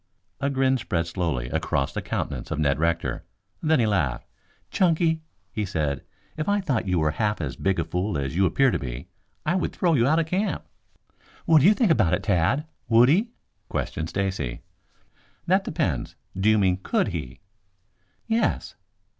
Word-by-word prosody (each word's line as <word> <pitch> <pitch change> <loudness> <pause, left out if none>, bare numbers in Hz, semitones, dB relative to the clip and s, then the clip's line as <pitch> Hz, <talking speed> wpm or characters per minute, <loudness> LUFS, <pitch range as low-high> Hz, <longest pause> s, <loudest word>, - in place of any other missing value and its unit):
A 140 - 0
grin 130 -1 +2
spread 85 -6 -1
slowly 85 -8 -2
across 70 - -1
the - - -3
countenance - - -4
of - - -2
Ned 75 -2 +1
Rector. 85 +1 0 0.4
Then 155 -2 +3
he 115 - +3
laughed. 75 - 0 0.5
"Chunky," 165 -3 +2 0.3
he 105 - -2
said, 75 -7 -1 0.4
"if 155 +5 -2
I 205 0 +3
thought 135 - -1
you 90 -1 +1
were 75 -2 +2
half 105 +4 -1
as 75 -5 -3
big 95 -1 0
a - - +2
fool 90 +3 -2
as 70 +2 -3
you 95 +1 +4
appear 135 +9 +3
to - - -1
be, 65 -1 -6 0.4
I 170 - +2
would 185 - 0
throw 175 -3 +2
you 120 -4 +3
out 155 +3 +3
of 165 - +2
camp." 185 +6 -1 0.8
"What 160 -2 +6
do 155 - +6
you 210 - +6
think 220 -7 +3
about 105 - +3
it, - - -6
Tad? 105 - +2 0.2
Would 120 +2 +6
he?" 200 - +3 0.4
questioned 80 +1 -3
Stacy. 95 -11 -2 0.8
"That 190 +3 +3
depends. 80 - -2 0.2
Do 95 +3 +2
you 110 - +5
mean 95 -3 +3
could - - +1
he?" 65 0 -6 0.9
"Yes." 230 0 0
100 Hz, 180 wpm, -25 LUFS, -, 0.9 s, What